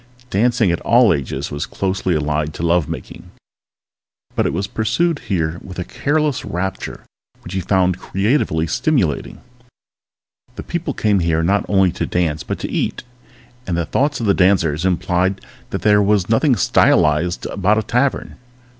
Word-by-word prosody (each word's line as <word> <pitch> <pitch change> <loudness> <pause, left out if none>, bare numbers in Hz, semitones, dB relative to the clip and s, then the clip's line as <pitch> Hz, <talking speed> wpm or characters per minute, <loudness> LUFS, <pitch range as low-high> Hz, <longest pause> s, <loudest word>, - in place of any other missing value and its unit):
Dancing 110 -1 +2
in 85 - -1
all 120 -4 +4
ages 70 -4 -4
was 75 - -4
closely 95 -2 -1
allied 75 0 -1
to - - -5
love 85 -2 +2
making, 80 - -8 1.1
but - - +1
it - - -1
was 95 +4 -2
pursued 130 - 0
here 85 -3 -1
with 95 - -10
a 90 - -2
careless 150 - -1
rapture 95 +2 -4 0.4
which 90 - -8
he 95 - -1
found 90 0 +1
creatively 95 - 0
stimulating. 120 - -1 1.3
People 170 -5 -3
came 105 -2 +2
here 80 -1 +1
not 100 +4 +1
only 95 -2 +3
to - - -3
dance 80 -4 -1
but - - -4
to - - -5
eat, - - -2 0.6
and 85 -2 -1
the 85 - 0
thoughts 145 - 0
of 115 - -2
the 100 - +4
dancers 90 -4 +2
implied 90 +1 0 0.3
that - - -4
there 105 -1 +5
was 100 -2 +2
nothing 125 +4 +3
stylized 85 -3 +2
about 100 +2 +1
a 110 - 0
tavern. 125 +5 -1
95 Hz, 155 wpm, -19 LUFS, 85-110 Hz, 1.3 s, there